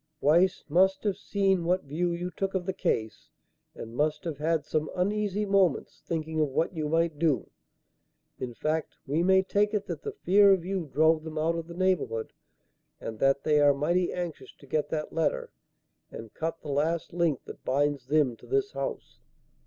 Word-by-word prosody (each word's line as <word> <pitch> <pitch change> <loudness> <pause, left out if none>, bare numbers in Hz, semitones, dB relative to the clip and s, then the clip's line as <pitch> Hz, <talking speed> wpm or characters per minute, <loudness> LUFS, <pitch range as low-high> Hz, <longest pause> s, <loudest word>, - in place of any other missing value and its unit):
Weiss 170 +6 +3
must 190 +5 +3
have 205 -3 0
seen 195 -2 +1
what 180 +2 +1
view 165 +5 -1
you 175 +1 -3
took 195 +1 -3
of 180 -2 -1
the 190 - -2
case 110 -10 -2 0.5
and 115 +1 -8
must 150 +3 0
have 160 -4 -4
had 160 0 0
some 155 0 -1
uneasy 205 +2 0
moments 195 -6 +1
thinking 160 -1 -3
of 150 - +3
what 160 +7 0
you 155 -2 -2
might 165 -1 +1
do. 155 -5 +1 0.9
In 120 -2 -5
fact, 155 +4 -2
we 145 +4 0
may 190 +1 +4
take 205 +2 +1
it 205 -1 -1
that - - -5
the 430 - -4
fear 200 - +5
of 180 -3 -1
you 185 -5 -3
drove 160 +1 +3
them 160 -1 -7
out 160 +2 +1
of 165 -1 -5
the 170 - -9
neighbourhood, 175 -12 0 0.7
and 110 -1 -7
that 135 0 +2
they 150 -1 +3
are 145 -1 +5
mighty 175 +6 +1
anxious 175 -3 -5
to - - -17
get 150 +2 -1
that 155 -1 -3
letter 165 -2 -1 0.6
and 115 -1 -10
cut 165 +1 -4
the 150 - -7
last 160 +5 -1
link 170 -6 0
that - - -10
binds 140 -1 0
them 145 -4 +2
to - - -16
this 410 +1 0
house." - - -5
165 Hz, 190 wpm, -28 LUFS, 150-185 Hz, 0.9 s, fear